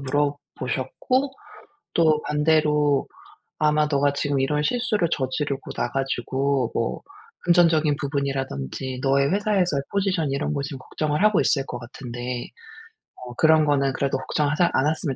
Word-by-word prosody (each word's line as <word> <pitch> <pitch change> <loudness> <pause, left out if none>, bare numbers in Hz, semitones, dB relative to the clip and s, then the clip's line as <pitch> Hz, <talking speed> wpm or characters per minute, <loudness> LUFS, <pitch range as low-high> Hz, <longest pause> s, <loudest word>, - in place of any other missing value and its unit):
물어보셨고 145 - -1 0.6
또 155 -2 +4
반대로 150 -1 +2 0.5
아마 150 0 +2
네가 140 0 +3
지금 140 -1 0
이런 150 +2 +1
실수를 215 -2 0
저지르고 135 +1 -2
나 120 - -2
가지고 135 -1 -1
뭐 115 - -1 0.4
"금전적인 165 -4 +4
부분이라든지 135 - -3
너의 140 +1 +2
회사에서의 195 -8 +1
포지션 190 -7 0
이런 140 +2 -1
거 140 - -1
지금 140 -1 -6
걱정을 150 +5 -2
하고 215 -3 +4
있을 135 -2 +2
것 120 - -5
같은데 120 0 -6 0.7
어 125 -1 -9
그런 160 +1 +5
거는 140 -2 +2
그래도 135 -1 0
걱정하자 150 +5 +1
않았으면 145 -1 0
145 Hz, 320 characters per minute, -24 LUFS, 135-155 Hz, 0.7 s, 그런